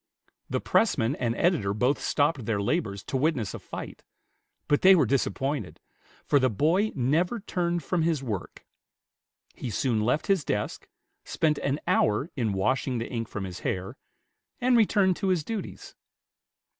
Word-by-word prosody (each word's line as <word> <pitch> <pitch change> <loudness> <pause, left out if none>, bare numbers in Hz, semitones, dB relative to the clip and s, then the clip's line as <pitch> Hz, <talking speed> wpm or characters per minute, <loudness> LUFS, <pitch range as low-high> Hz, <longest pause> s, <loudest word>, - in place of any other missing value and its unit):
The - - 0
pressman 135 - +2
and 120 -2 -1
editor 130 - +1
both 125 +6 +1
stopped 145 -5 0
their 110 -3 0
labors 100 - -1
to 135 - -2
witness 130 -7 0
a - - -6
fight; - - -8 0.6
but 145 - +2
they 190 0 +8
were 155 -6 +4
disappointed, 135 -3 -1 0.5
for 145 - +4
the 130 -1 +3
boy 165 - +2
never 160 - +1
turned 175 -4 -2
from 175 +4 0
his 160 -4 0
work. 105 -7 -5 0.9
He 125 - -6
soon 115 0 0
left 125 +8 +1
his 195 -6 +2
desk, 105 -4 -3 0.4
spent 155 -2 0
an 140 +2 -1
hour 110 +9 +1
in 115 -7 0
washing 125 +6 0
the 115 - -4
ink 115 -2 -3
from 100 -2 -5
his 90 -2 -6
hair, 95 +6 -3 0.6
and 250 0 +3
returned 200 -5 +3
to 195 - -2
his 180 -5 +1
duties. 220 +4 -6
135 Hz, 155 wpm, -27 LUFS, 115-170 Hz, 0.9 s, they